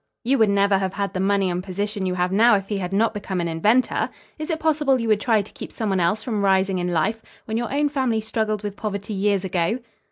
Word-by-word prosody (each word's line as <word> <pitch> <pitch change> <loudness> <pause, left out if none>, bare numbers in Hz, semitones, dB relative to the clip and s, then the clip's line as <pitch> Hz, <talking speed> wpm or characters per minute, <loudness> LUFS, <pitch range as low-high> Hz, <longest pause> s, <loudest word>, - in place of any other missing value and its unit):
You 265 +3 +2
would 220 -2 +5
never 200 -1 +3
have 190 -1 -2
had 200 -1 -2
the 185 - -2
money 195 0 +2
and 180 +1 -3
position 200 +1 -3
you 180 - -1
have 180 0 0
now 220 +3 +5
if 195 -1 -3
he 205 -2 -1
had 180 -1 -4
not 220 +4 +2
become 195 -3 -4
an 170 - -1
inventor. 210 +10 +2 0.3
Is 310 - -5
it 320 -2 -1
possible 295 -4 +2
you 230 - -2
would 210 -1 +3
try 220 -3 +2
to 200 - -14
keep - - -9
some 220 -2 -3
one 190 -1 +1
else 205 +6 +1
from 215 -4 -2
rising 190 -1 +2
in 175 - -1
life, 195 +7 0 0.2
when 220 -3 -4
your 235 +1 -2
own 290 +2 +2
family 260 -6 0
struggled 215 -1 -2
with 205 -1 -4
poverty 205 0 -4
years 200 -1 +1
ago?" 185 +4 0
205 Hz, 255 wpm, -23 LUFS, 190-225 Hz, 0.3 s, would